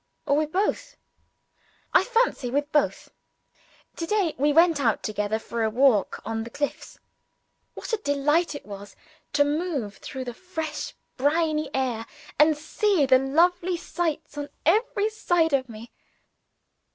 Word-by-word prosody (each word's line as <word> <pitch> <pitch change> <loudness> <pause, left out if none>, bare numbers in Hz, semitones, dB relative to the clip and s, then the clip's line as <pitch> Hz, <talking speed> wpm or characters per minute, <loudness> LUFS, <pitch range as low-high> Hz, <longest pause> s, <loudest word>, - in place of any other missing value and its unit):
or 280 - +2
with 305 0 0
both? 420 +7 -1 1.0
I - - +6
fancy 470 - +1
with 290 +4 -1
both. 295 - 0 0.9
To 330 - -3
day, 395 -5 +1
we 295 +2 +3
went 330 0 +5
out 225 -5 +1
together 210 0 -1
for 230 +1 -5
a 220 - +2
walk 240 -2 +3
on 225 0 -2
the 230 - -8
cliffs. 285 +3 -4 0.8
What - - -7
a - - +3
delight 295 -1 +1
it - - -8
was 200 0 -10 0.4
to 290 0 +4
move 290 - -2
through 265 -2 -6
the 245 - -5
fresh 320 -2 -5 0.2
briny 305 +1 +1
air, 240 -4 -1 0.3
and 305 0 +5
see 330 +2 +1
the 260 -1 +5
lovely 345 +6 +2
sights 310 -3 -3
on 290 0 -5 0.2
every 425 +4 +2
side 345 -7 +1
of 260 -2 +1
me! 225 +1 -10
295 Hz, 145 wpm, -25 LUFS, 260-340 Hz, 1.0 s, I